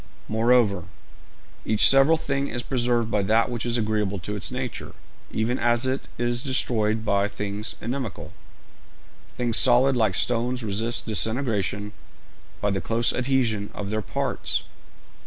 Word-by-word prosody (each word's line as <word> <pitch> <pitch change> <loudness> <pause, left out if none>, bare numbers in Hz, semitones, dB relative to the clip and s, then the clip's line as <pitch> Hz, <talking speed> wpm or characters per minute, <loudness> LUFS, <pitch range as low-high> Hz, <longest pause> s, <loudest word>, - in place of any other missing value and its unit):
Moreover, 110 -5 +2 0.8
each 110 -1 +5
several 135 +4 +6
thing 140 -2 -2
is 120 -2 -3
preserved 120 -3 0
by 105 - +1
that 110 +5 +2
which 120 0 -3
is 120 0 0
agreeable 105 -3 -1
to 100 +4 -5
its 100 - -1
nature, 125 -1 -5 0.4
even 115 +3 -1
as 120 +1 +1
it 130 +1 -2
is 120 0 0
destroyed 110 -5 0
by 100 -1 +2
things 105 +1 -5
inimical. 120 - -5 1.0
Things 120 -2 +2
solid 130 +1 +5
like 110 -6 +1
stones 125 +2 0
resist 110 +3 -1
disintegration 105 -3 -1 0.7
by 105 - 0
the 95 -1 -2
close 115 +6 0
adhesion 125 -5 0
of 100 0 -5
their 110 0 -1
parts. - - -1
115 Hz, 140 wpm, -24 LUFS, 105-125 Hz, 1.0 s, several